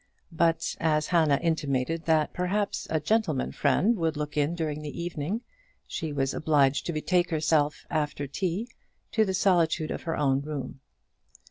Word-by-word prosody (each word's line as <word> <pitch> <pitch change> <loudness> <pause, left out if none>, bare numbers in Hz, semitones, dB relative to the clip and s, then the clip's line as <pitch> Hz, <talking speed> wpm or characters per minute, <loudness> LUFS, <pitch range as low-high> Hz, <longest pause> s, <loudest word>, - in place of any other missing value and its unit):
But 165 0 +1
as 155 -1 +2
Hannah 155 -5 +3
intimated 160 -1 0
that 160 -2 +2
perhaps 195 +3 -1
a 160 - +1
gentleman 160 - 0
friend 180 - +2
would 160 -3 0
look 150 0 -4
in 150 +3 +1
during 155 -3 -3
the 150 +1 -6
evening, 170 +5 -3 0.4
she 160 -4 -4
was 135 -1 0
obliged 145 -3 +2
to - - 0
betake 175 +3 +1
herself, 155 -2 +1
after 150 -2 -2
tea, 180 - -2 0.4
to 220 -1 +3
the 190 -1 -1
solitude 170 -5 +2
of - - -4
her 165 - -3
own 135 -2 +2
room. 140 -3 -5
160 Hz, 155 wpm, -27 LUFS, 145-170 Hz, 0.4 s, Hannah